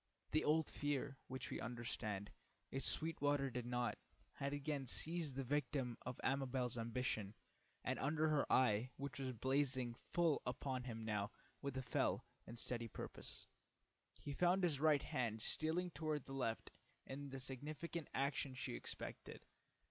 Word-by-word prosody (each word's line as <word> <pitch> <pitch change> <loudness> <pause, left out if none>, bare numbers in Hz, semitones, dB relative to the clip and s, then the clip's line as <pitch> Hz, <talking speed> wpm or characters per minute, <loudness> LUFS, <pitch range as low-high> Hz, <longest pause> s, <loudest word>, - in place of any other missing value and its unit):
The 155 - +4
old 155 0 +4
fear, 140 -1 -1
which 130 +1 -4
we - - -1
understand, 110 -4 -2 0.4
if 135 0 -1
Sweetwater 145 -3 +3
did 125 0 -2
not, 120 0 0 0.3
had 140 0 -1
again 145 -1 -1
seized 160 +1 -1
the 135 - 0
victim 130 -2 +1
of 125 0 -4
Amabel's 130 -2 +1
ambition, 115 -3 -1 0.5
and - - 0
under 155 +3 +3
her 150 -2 +3
eye, 125 -1 +5
which 140 -1 -3
was 130 -1 0
blazing 130 0 +2
full 165 +5 +2
upon 130 0 -1
him 115 -3 -4
now 105 -2 +1 0.3
with 140 -2 -2
a 130 - -1
fell - - +2 0.2
and 120 - -7
steady 120 0 -1
purpose, - - -6 0.7
he 145 - -4
found 180 +4 +4
his 155 -6 +3
right 150 -2 +5
hand 115 -3 0
stealing 175 +3 0
toward 155 -4 -1
the 135 - -6
left 120 -4 -1 0.3
in 140 +1 -5
the 135 0 -4
significant 150 +5 -3
action 135 -1 +1
she 125 - -2
expected. - - -5
135 Hz, 150 wpm, -42 LUFS, 125-145 Hz, 0.7 s, eye